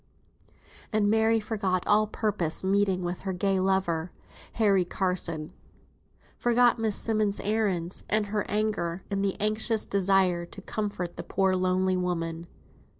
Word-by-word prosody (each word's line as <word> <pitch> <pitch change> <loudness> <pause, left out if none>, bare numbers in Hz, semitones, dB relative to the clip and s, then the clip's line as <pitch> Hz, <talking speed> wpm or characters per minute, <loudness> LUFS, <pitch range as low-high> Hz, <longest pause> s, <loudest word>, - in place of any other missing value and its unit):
And 210 -2 +2
Mary 220 +1 +3
forgot 200 -4 -1
all 215 +1 +3
purposed 205 -7 -1
meeting 190 -1 +1
with 175 0 -3
her 190 -1 -4
gay 190 +1 +1
lover, 185 -3 0 0.4
Harry 200 -4 +3
Carson; 175 -4 -2 0.9
forgot 240 0 +3
Miss 220 -2 +1
Simmonds' 215 -2 0
errands, 200 -5 -1
and 215 0 +2
her 205 0 -1
anger, 205 -4 -1
in 195 -1 0
the 195 -1 -1
anxious 215 +1 +1
desire 190 -3 +2
to 195 - -11
comfort 200 -5 -4
the - - -5
poor 190 -1 +1
lone 185 0 +1
woman. 165 -1 -3
195 Hz, 135 wpm, -27 LUFS, 180-215 Hz, 0.9 s, Mary